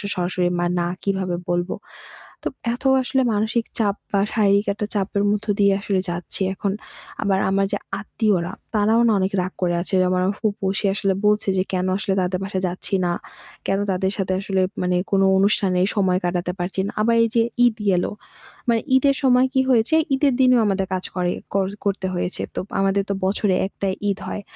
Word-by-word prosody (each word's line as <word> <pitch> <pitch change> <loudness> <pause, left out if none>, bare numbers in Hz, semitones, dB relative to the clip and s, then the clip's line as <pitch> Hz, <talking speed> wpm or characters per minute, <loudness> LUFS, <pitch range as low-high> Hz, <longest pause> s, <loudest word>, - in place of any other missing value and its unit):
সরাসরি 180 0 0
বা 175 - +1
না 175 - 0 0.2
কীভাবে 190 -3 -1
বলব? 175 +1 0 0.7
তো - - -1 0.3
এত 250 - -10 0.2
আসলে 265 +1 +1
মানসিক 220 +2 0
চাপ 205 -3 +2 0.2
বা 200 - +3
শারীরিক 200 -1 +3
একটা 210 0 -3
চাপের 200 0 0
মধ্য 210 +1 -1
দিয়ে 200 -1 +5
আসলে 195 -2 0
যাচ্ছি। 175 +3 -4
এখন 195 +1 -2 0.5
আবার 195 -2 +2
আমার 195 0 +2
যে, - - 0 0.2
আত্মীয়রা 195 -4 0 0.2
তারাও 215 +2 +3
না - - +4
অনেক 190 +1 0
রাগ 180 +1 -3
করে 175 -1 +2
আছে, 175 - -4 0.2
আমার 180 0 +1 0.2
ফুফু 205 -3 -2
সে 210 - 0
আসলে 195 -1 0
বলছে 210 -1 +2
যে, - - +3
কেন 185 0 0
আসলে 200 -1 -1
তাদের 185 0 -1
বাসায় 190 -1 -3
যাচ্ছি 180 +2 -5
না? 175 - +1 0.5
কেন 195 - +1
তাদের 190 +1 0
সাথে 190 -1 -1
আসলে 195 -1 -1 0.2
মানে 180 0 +1
কোনো 195 -1 +3
অনুষ্ঠানের 190 -2 +2
সময় 185 -3 +2
কাটাতে 175 0 -1
পারছি 180 +2 -2
না। - - -3
আবার 230 +2 +3
এই 230 - +3
যে, 230 - +4 0.2
ঈদ 240 -3 +3 0.2
এলো - - -1 0.6
মানে 230 -1 +3 0.2
ঈদের 275 +1 +3
সময় 255 -1 +5
কী 265 - +4
হয়েছে? 235 +4 +3 0.2
ঈদের 275 +1 +3
দিনেও 255 -2 +5
আমাদের 195 -1 0
কাজ 185 - -3
করে 180 -1 0 0.2
কর 195 -1 +2 0.2
করতে 200 -1 -1
হয়েছে। 175 +1 -2
তো - - -2 0.2
আমাদের 195 0 +2
তো - - +2
বছরে 195 0 +1
একটা 200 0 -5 0.2
ঈদ 200 0 0
হয় 210 - -4
195 Hz, 190 wpm, -22 LUFS, 185-210 Hz, 0.7 s, দিয়ে